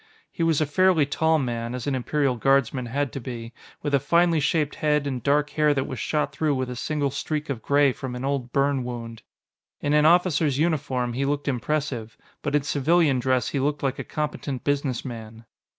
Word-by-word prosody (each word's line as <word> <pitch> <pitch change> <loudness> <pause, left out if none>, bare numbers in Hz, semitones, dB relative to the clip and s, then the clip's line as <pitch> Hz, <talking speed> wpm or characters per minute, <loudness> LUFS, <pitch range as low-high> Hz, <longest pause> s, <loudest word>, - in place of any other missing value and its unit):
He - - -6
was 165 -3 +3
a 155 - +2
fairly 175 +1 +3
tall 160 +3 +2
man, 120 -3 -2
as 125 - -5
an 140 - 0
Imperial 135 +1 0
Guardsman 130 0 +1
had 140 +3 -2
to - - -4
be, 120 -2 -7 0.3
with 145 -1 -2
a 140 - +5
finely 170 +3 +3
shaped 150 0 +1
head 150 -2 +1
and 130 -3 -3
dark 145 +3 +1
hair 150 -1 +2
that 135 - 0
was 130 - -6
shot 150 -1 -1
through 155 -3 0
with 130 -1 -2
a - - -5
single 145 +2 -1
streak 150 +2 -3
of 120 -4 -4
gray 140 +1 +3
from 125 0 -6
an 125 +2 -4
old 135 -3 -2
burn 140 -1 +1
wound. 115 -2 -6 0.6
In 145 - 0
an 150 0 +5
officer's 165 -5 +3
uniform, 135 -6 0
he 130 +3 -1
looked 145 +1 -1
impressive, 130 -3 -2 0.2
but 145 -1 -1
in 145 - +2
civilian 150 0 +2
dress 130 0 +1
he 140 - -2
looked 145 +2 -1
like 135 0 -1
a - - -3
competent 150 -3 -4
businessman. 120 -5 -3
140 Hz, 200 wpm, -25 LUFS, 125-150 Hz, 0.6 s, a